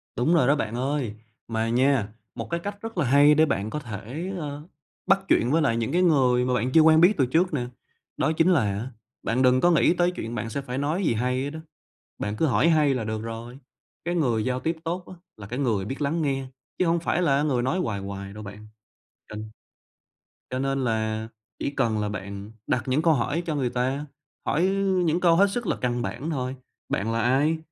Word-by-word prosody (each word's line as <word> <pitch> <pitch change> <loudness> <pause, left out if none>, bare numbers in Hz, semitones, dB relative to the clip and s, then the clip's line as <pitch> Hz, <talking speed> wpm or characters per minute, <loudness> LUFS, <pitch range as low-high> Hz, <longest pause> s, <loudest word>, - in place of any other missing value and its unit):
Đúng 125 +8 +2
rồi 160 -7 +4
đó 145 - +5
bạn 115 -6 -3
ơi! 130 -3 -1 0.3
Mà 115 0 -1
nha, 125 -2 +2 0.3
một - - -6
cái 170 - -1
cách 205 +3 -5
rất 225 -2 -7
là 170 - +2
hay 145 +4 +6
để 155 +1 +5
bạn 110 -8 -1
có 150 - -3
thể, 125 - -6
ờ, 150 0 -6 0.4
bắt 195 - +5
chuyện 125 -8 +3
với 165 +2 +3
lại 115 -6 +2
những 115 -1 -1
cái 180 - +2
người 130 -8 +3
mà 125 - 0
bạn 125 +1 0
chưa 160 - +6
quen 160 0 +6
biết 180 +5 +7
từ 135 - +3
trước 165 +7 +1
nè. 125 -5 -1 0.5
Đó 145 - +1
chính 165 +3 +4
là 165 -7 +4
á, 105 +3 -2 0.3
bạn 125 +3 0
đừng 130 0 +4
có 175 - +5
nghĩ 165 0 +4
tới 175 0 +2
chuyện 115 -9 -6
bạn 115 0 -3
sẽ 140 +4 -3
phải 125 -1 -5
nói 155 +7 -1
gì 120 - +2
hay 125 +3 0
hết 140 - -2
đó, 160 +2 -7 0.6
bạn 105 +1 -3
cứ 160 - +2
hỏi 125 +3 +3
hay 150 -4 +4
là 125 -3 -2
được 110 0 -3
rồi, 115 +3 -7 0.5
cái 175 +1 -1
người 120 -10 +1
giao 130 0 -1
tiếp 165 +4 -1
tốt 175 +2 -3
á, - - -10 0.2
là 100 - -9
cái 125 +5 -5
người 115 -8 0
biết 135 +8 -5
lắng 160 +4 0
nghe, 135 -2 -1 0.3
chứ 185 - +2
hổng 170 +1 +2
phải 170 +1 0
là 140 -4 +3
người 135 -5 +1
nói 130 +8 0
hoài 105 - -2
hoài 100 0 -6
đâu, 105 +1 -9
bạn. 105 +1 -10 0.6
Ừm. 105 0 -6 1.1
Cho 130 - -2
nên 135 0 -1
là 110 -1 -1 0.3
chỉ - - -2
cần 120 -6 0
là 105 0 -1
bạn 100 0 -7
đặt 125 - 0
những 135 +4 +1
câu 165 -1 +4
hỏi 145 +6 -1
cho 160 - -1
người 130 -4 0
ta, 130 +4 -1 0.4
hỏi 155 - +1 0.4
những 165 +1 +1
câu 170 -2 +4
hết 200 +3 +6
sức 240 +2 -3
là - - 0
căn 120 -1 -1
bản 115 +11 -4
thôi: 130 -3 -3 0.3
"Bạn 110 +4 -1
là 115 0 0
ai? 140 +7 +2
130 Hz, 230 wpm, -25 LUFS, 115-160 Hz, 1.1 s, biết